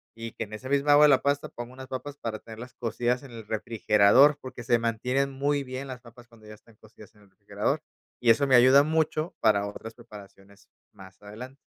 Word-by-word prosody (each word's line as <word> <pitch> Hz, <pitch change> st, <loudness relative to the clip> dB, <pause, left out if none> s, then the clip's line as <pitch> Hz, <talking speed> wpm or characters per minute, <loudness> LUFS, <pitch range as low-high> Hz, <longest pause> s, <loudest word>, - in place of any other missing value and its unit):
y 115 Hz, 0 st, -8 dB
que -, -, -5 dB
en 110 Hz, -, -15 dB
esa 130 Hz, +5 st, -8 dB
misma 140 Hz, +1 st, +2 dB
agua 150 Hz, +1 st, +7 dB
de 150 Hz, -, +5 dB
la 135 Hz, -2 st, +3 dB
pasta 140 Hz, 0 st, -1 dB
pongo 120 Hz, +1 st, -9 dB
unas 130 Hz, 0 st, -11 dB
papas 135 Hz, +3 st, -7 dB
para 115 Hz, -5 st, -5 dB
tenerlas 115 Hz, +3 st, -11 dB
cocidas 120 Hz, +2 st, -2 dB
en 135 Hz, -, -13 dB
el 115 Hz, -2 st, -11 dB
refrigerador, 110 Hz, +5 st, +3 dB
porque 130 Hz, -2 st, -9 dB
se 120 Hz, 0 st, +2 dB
mantienen 125 Hz, +4 st, -1 dB
muy 140 Hz, +1 st, -1 dB
bien 130 Hz, +1 st, -7 dB
las 130 Hz, -2 st, -8 dB
papas 120 Hz, 0 st, -17 dB
cuando 115 Hz, -2 st, -20 dB
ya 105 Hz, -, -10 dB
están 110 Hz, +1 st, -23 dB
cocidas 110 Hz, 0 st, -18 dB
en 105 Hz, -, -23 dB
el 100 Hz, -, -25 dB
refrigerador 105 Hz, +9 st, -3 dB, 0.4 s
y 120 Hz, -, +1 dB
eso 115 Hz, +5 st, +4 dB
me 130 Hz, -, +4 dB
ayuda 130 Hz, +3 st, +6 dB
mucho 160 Hz, +2 st, -1 dB
para 100 Hz, -1 st, +2 dB
otras 110 Hz, +2 st, -9 dB
preparaciones 100 Hz, -3 st, -16 dB, 0.2 s
más 95 Hz, -2 st, -16 dB
adelante. 120 Hz, +6 st, -11 dB
120 Hz, 215 wpm, -26 LUFS, 110-135 Hz, 0.4 s, agua